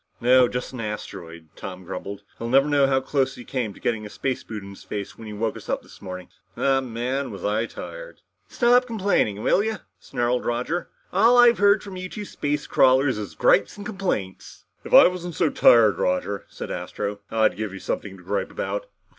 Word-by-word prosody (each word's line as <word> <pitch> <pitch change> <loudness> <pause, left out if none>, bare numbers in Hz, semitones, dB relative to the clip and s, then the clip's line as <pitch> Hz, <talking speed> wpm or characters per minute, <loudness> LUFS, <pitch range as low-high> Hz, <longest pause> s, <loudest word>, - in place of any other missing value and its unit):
"No, 125 +1 +5
just 125 +2 -4
an 125 - -7
asteroid," 85 -7 -7
Tom 95 -1 -8
grumbled. 95 +2 -7 0.2
"He'll 115 - -4
never 135 +3 +4
know 145 -2 +3
how 135 -1 +2
close 135 0 0
he 120 - -11
came 125 -6 -2
to - - -14
getting 115 -2 -1
a 105 - -7
space 130 +4 -3
boot 105 -3 -7
in 100 - -9
the - - -11
face 100 -2 -6
when 110 - -10
he 105 - -7
woke 110 +2 -2
us - - -11
up - - -1
this - - -17
morning. 90 -2 -7 0.3
Oh, 135 -1 +2
man! 130 +2 -3
Was 100 -5 -7
I 110 +3 0
tired!" - - -9 0.3
"Stop 245 +1 +3
complaining, 195 - 0
will 200 - +3
you?" 220 0 -1 0.2
snarled 120 +1 -1
Roger. 125 +9 -2 0.2
"All 230 +6 +5
I've 240 -1 +6
heard 205 0 +4
from 195 -2 -8
you 185 0 -5
two 210 +1 -6
space 145 -5 -2
crawlers 130 -2 +3
is 95 -7 -7
gripes 100 - +3
and 205 - -8
complaints." 185 - -4 0.2
"If - - -9
I - - +9
wasn't 180 -2 -5
so 165 -3 +2
tired, 110 -4 +5
Roger," 95 +2 -1
said - - -7
Astro, 100 +3 -4
"I'd 110 -5 +2
give 110 0 -4
you 95 - -8
something 95 0 -4
to 90 - -16
gripe 100 +3 -2
about. - - -4
120 Hz, 205 wpm, -24 LUFS, 105-170 Hz, 0.3 s, I